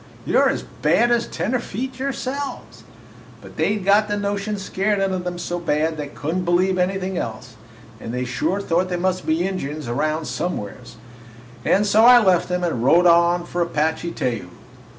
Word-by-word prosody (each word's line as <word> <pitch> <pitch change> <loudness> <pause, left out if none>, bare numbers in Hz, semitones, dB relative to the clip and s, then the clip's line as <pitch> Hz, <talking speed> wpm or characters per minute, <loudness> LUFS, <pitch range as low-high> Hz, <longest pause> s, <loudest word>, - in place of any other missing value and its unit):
You - - +2
're - - +4
as - - -2
bad 240 0 +1
as 235 -1 +1
tenderfeet 255 +1 -3
yourselves!' 275 +1 -5 0.6
"But - - -14
they 210 - +1
'd 195 - -7
got 205 +2 +4
the 205 0 -1
notion 205 +1 -2
scared 195 +2 -1
into 190 -1 0
them 180 0 -5
so 175 0 -3
bad 160 -1 0
they 150 -1 -4
could 155 +4 -4
n't 185 - -1
believe 185 +2 +2
anything 190 0 -1
else, 120 +2 -6 0.5
and 115 - -6
they 125 +1 -2
sure 155 +10 -1
thought 180 0 0
there 180 - -1
must 185 +1 -1
be 165 +3 +1
Injuns 155 -7 -5
around 155 +6 -1
somewheres; 125 - -5 0.7
and 205 - +3
so 210 +2 +4
I 245 +1 +9
left 190 -7 +3
'em 180 0 -1
and 160 -9 -1
rode 170 +7 +5
on 170 0 +4
for 175 0 -3
Apache 160 0 -1
Teju. 120 -4 -3
180 Hz, 180 wpm, -21 LUFS, 160-200 Hz, 0.7 s, I